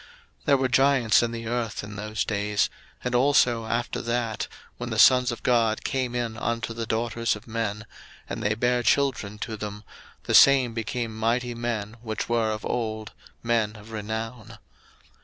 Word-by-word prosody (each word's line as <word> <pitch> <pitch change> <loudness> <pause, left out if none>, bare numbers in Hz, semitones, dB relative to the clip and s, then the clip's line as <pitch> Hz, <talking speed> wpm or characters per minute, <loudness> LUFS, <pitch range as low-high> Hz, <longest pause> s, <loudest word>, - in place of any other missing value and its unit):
01:006:004 - - -20 0.4
There 140 -1 +5
were 130 0 +1
giants 130 -3 +4
in 120 -1 -1
the 115 0 -6
earth 115 -3 -2
in 105 +1 -8
those 105 +1 -2
days; 105 -1 0 0.3
and 125 - -2
also 120 -3 +3
after 120 +1 -2
that, 115 -2 -2 0.3
when - - -5
the - - -3
sons 125 -1 +6
of 120 - -7
God 115 -3 +2
came 130 -3 -1
in 115 -2 -2
unto 115 0 -2
the 115 -1 -4
daughters 115 0 0
of 105 - -12
men, 110 -1 -3 0.4
and - - -5
they 105 +1 +1
bare 120 +2 +1
children 120 -6 +1
to 110 +1 -4
them, 105 0 -6 0.4
the - - -2
same 130 -4 +7
became 115 0 -3
mighty 120 +2 0
men 115 -2 -3
which 110 -3 -4
were 115 -2 +1
of 110 0 -4
old, 110 -3 -3 0.3
men 115 -2 +1
of 105 +1 -13
renown. 110 +1 -5
115 Hz, 175 wpm, -26 LUFS, 110-120 Hz, 0.4 s, same